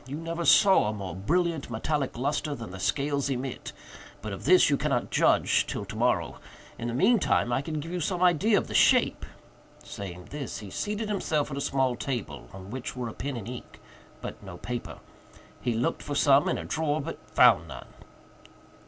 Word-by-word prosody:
You 135 - -5
never 165 +1 -4
saw 190 - +6
a - - -2
more 95 -5 -6
brilliant 165 - 0
metallic 135 +3 -2
lustre 145 +3 -1
than 115 -7 -8
the 95 - -8
scales 140 +5 0
emit—but 125 -4 -7
of 95 - -8
this 180 +5 +6
you 145 - +3
cannot 135 -4 -1
judge - - +3
till - - -4
tomorrow. - - -1 0.4
In 120 - -3
the 120 - -3
mean 230 - +4
time 120 -8 +1
I 130 - +1
can 155 +1 -4
give 165 +3 -6
you 180 - -2
some 180 +2 -1
idea 185 +5 +4
of - - 0
the - - -7
shape." - - +3 0.6
Saying 90 -3 -8
this, 145 -4 -5
he 100 -3 -9
seated 210 - -3
himself 160 -8 -1
at 135 - -4
a - - -2
small 130 -2 +1
table, 120 - -5
on 95 +1 -10
which 130 0 -5
were 125 -2 -3
a - - -8
pen 140 -2 -4
and 110 -2 -7
ink, 125 0 -9 0.4
but - - -7
no 95 -3 -9
paper. 120 +4 -5 0.6
He 120 -2 -1
looked 120 +2 -1
for 145 - -4
some 140 0 +4
in - - 0
a - - -6
drawer, 155 -1 -1
but 140 - -5
found 85 - +5
none. 60 -5 -9
135 Hz, 195 wpm, -27 LUFS, 115-155 Hz, 0.6 s, saw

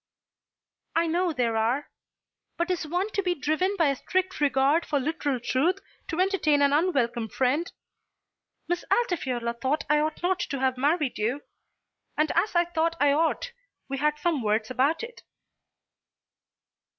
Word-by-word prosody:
"I 330 +1 +3
know 345 +2 +1
there 245 -6 0
are. 235 +6 0 0.7
But 345 +2 0
is 340 -3 -2
one 360 +6 -1
to 400 - 0
be 360 -2 0
driven 315 +7 0
by 325 -4 +3
a 275 - 0
strict 375 +1 -2
regard 280 +3 +3
for 290 -2 0
literal 285 -2 -1
truth 285 +10 +1 0.3
to 330 - -3
entertain 345 -7 +3
an 280 0 +3
unwelcome 250 -9 +1
friend? 270 +9 0 1.0
Miss 350 0 -1
Altifiorla 255 - 0
thought 275 +5 +1
that 300 - +3
I 300 - +4
ought 310 +2 -2
not 365 +1 +1
to 275 - -3
have 260 -1 +1
married 290 0 0
you, 245 +7 -1 0.7
and 305 +1 +2
as 360 +4 +1
I 345 0 +4
thought 335 -1 0
I 285 0 +4
ought 325 +10 0 0.4
we 275 0 -4
had 300 +1 +1
some 305 -2 0
words 220 +1 0
about 275 - +1
it." 470 0 -9
300 Hz, 160 wpm, -26 LUFS, 265-345 Hz, 1.0 s, I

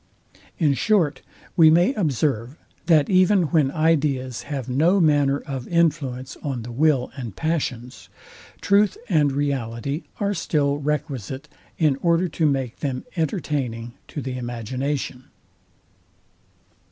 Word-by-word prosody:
In 150 -5 +3
short, 165 - +1 0.3
we 165 -3 +7
may 175 - +4
observe, 140 - -1 0.3
that 155 -4 +5
even 185 0 +4
when 150 -5 +4
ideas 140 -5 0
have 135 -4 -3
no 160 +10 +3
manner 145 -4 +3
of 130 -3 -6
influence 145 -6 0
on 130 -5 -3
the 120 - -7
will 135 0 +2
and 120 -7 -6
passions, 130 -7 -3 0.5
truth 200 0 +3
and 150 -6 +3
reality 140 +1 -2
are 205 0 0
still 145 -5 0
requisite, 140 -4 -3 0.3
in 150 -4 +2
order 170 +4 +2
to 160 0 +1
make 135 -4 -1
them 130 -3 -3
entertaining 140 - -2
to 145 - -6
the 130 -1 -4
imagination. 125 +3 -4
145 Hz, 120 wpm, -23 LUFS, 130-160 Hz, 0.5 s, we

